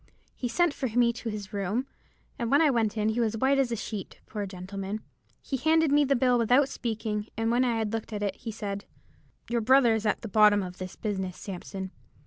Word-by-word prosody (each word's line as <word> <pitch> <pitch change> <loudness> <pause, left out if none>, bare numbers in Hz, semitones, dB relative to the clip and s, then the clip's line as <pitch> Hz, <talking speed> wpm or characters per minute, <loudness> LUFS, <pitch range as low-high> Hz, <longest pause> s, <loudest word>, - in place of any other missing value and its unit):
He 250 - -3
sent 345 +5 +2
for 265 - -2
me 235 +1 +3
to 235 0 -5
his 210 -1 -6
room; 205 +6 -1 0.5
and 235 -2 -1
when 285 - +5
I 315 -3 +5
went 230 -3 0
in, 215 0 +2
he 220 +2 -1
was 225 -2 +1
as - - -5
white 275 +2 +3
as 260 -3 +2
a - - +1
sheet, 210 -2 -6
poor 205 -2 -4
gentleman. 195 +2 -5 0.4
He 270 - -2
handed 320 +2 +3
me 290 0 +5
the 275 0 +2
bill 250 -1 +3
without 250 +5 +4
speaking, 215 -2 -3
and 225 0 +1
when 245 +2 +3
I 240 -2 +1
had 220 -1 -2
looked 225 0 -3
at 205 -1 -3
it, 195 -1 -2
he 230 - -6
said— 200 -2 -5 0.6
"'Your 235 0 0
brother 250 0 +5
is 220 -1 0
at 210 - 0
the - - -3
bottom 210 -1 +5
of 180 0 -8
this 185 0 -6
business, 190 -4 -3
Sampson. 190 0 -6
225 Hz, 230 wpm, -28 LUFS, 205-245 Hz, 0.6 s, when